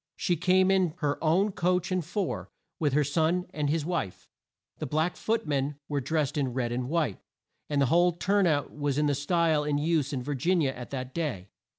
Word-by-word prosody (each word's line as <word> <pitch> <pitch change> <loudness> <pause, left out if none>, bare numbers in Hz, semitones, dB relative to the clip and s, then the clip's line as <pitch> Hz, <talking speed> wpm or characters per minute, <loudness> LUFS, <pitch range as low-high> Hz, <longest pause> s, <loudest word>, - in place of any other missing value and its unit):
She 175 - 0
came 185 +3 +3
in 185 -4 +2
her 150 -3 -2
own 185 +6 +3
coach 180 0 0
and 185 -1 0
four, 180 +4 -3 0.3
with 145 -4 +1
her 150 +1 +4
son 160 +5 +1
and 150 -2 -1
his 155 0 0
wife. 165 - -3 0.5
The - - -3
black 155 +6 0
foot 225 -3 -1
men 145 -1 -1
were 145 -1 -1
drest 150 +1 -1
in 130 -3 -1
red 120 -3 -1
and 125 +1 -2
white, 155 - 0 0.5
and 145 -1 +1
the 140 - +4
whole 175 +1 +5
turn 195 +3 +2
out 145 -4 0
was 145 -2 -1
in 150 - +2
the 145 - +2
style 155 +2 +1
in 145 -1 0
use 150 -2 +1
in 130 -3 -3
Vir 145 +3 -3
gin 170 +7 +1
i - - +2
a 135 - 0
at 125 -1 -8
that 130 -1 -5
day. 125 - -3
150 Hz, 220 wpm, -28 LUFS, 140-175 Hz, 0.5 s, whole